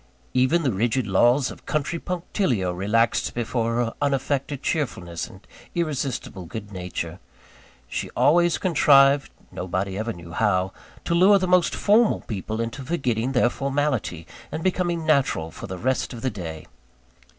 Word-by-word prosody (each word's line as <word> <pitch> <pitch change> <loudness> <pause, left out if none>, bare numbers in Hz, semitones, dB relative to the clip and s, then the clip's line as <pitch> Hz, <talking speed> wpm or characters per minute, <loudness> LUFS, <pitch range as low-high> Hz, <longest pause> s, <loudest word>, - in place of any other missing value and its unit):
Even 130 +7 +3
the 130 - +2
rigid 115 +5 0
laws 120 +7 +3
of - - -14
country 155 +3 -1
punctilio 165 - -1
relaxed 105 +5 +1
before 115 -1 -1
her 120 -1 0
unaffected 140 0 -1
cheerfulness 90 - -2
and - - -15 0.3
irresistible 140 - -2
good 105 +2 -7
nature. 90 -2 -5 0.7
She - - -4
always 175 +2 +4
contrived 140 -5 +5 0.2
nobody 95 +2 -3
ever 115 +2 -2
knew 85 -4 -10
how 95 0 +1 0.3
to - - 0
lure 190 +4 +6
the 185 -1 -1
most 180 -1 +3
formal 215 +2 +3
people 110 +1 -4
into 115 +4 -3
forgetting 130 -5 -1
their 125 -1 +3
formality, 135 - -1 0.3
and 160 - -4
becoming 175 -3 0
natural 135 - +1
for - - -8
the 95 -1 -5
rest 130 +6 -1
of 115 - -8
the 130 - 0
day. 80 -6 -7
125 Hz, 145 wpm, -24 LUFS, 100-150 Hz, 0.7 s, lure